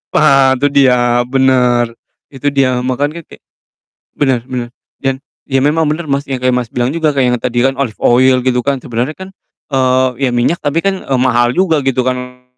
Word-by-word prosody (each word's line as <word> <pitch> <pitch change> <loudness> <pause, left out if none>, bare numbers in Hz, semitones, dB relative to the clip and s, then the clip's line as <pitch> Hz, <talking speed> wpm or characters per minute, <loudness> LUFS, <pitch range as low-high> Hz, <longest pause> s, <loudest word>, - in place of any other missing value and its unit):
Ha! 135 -3 +4
Itu 145 +3 +1
dia, 125 -3 +3
bener! 125 -3 +2 0.4
Itu 135 +1 -5
dia, 130 -3 +1
makannya 145 +6 -3
kek - - -16 0.7
bener 130 -4 0
bener 120 -2 -5 0.3
dan 135 -1 -1 0.3
ya 135 - +1
memang 155 +1 +1
bener, 160 +2 -3
Mas, 140 -1 -1
yang 135 - -2
kayak 125 0 +1
Mas 125 -2 -2
bilang 125 +2 -1
juga 160 -2 +1
kayak 135 - +2
yang - - -2
tadi 120 -1 -2
kan, 135 - +1
olive 115 -6 -2
oil, 130 +2 +4
gitu 125 -1 +1
kan, 140 +1 0
sebenernya 120 +5 -3
kan, 190 0 -9 0.4
eee, 130 -1 +2 0.2
ya - - -2
minyak 120 +8 0
tapi 145 +3 0
kan, 195 -1 0
eee, 135 -2 -1
mahal 120 -1 +2
juga, 165 -5 +2
gitu 130 -1 0
kan, 125 0 -4
130 Hz, 190 wpm, -14 LUFS, 125-140 Hz, 0.7 s, Ha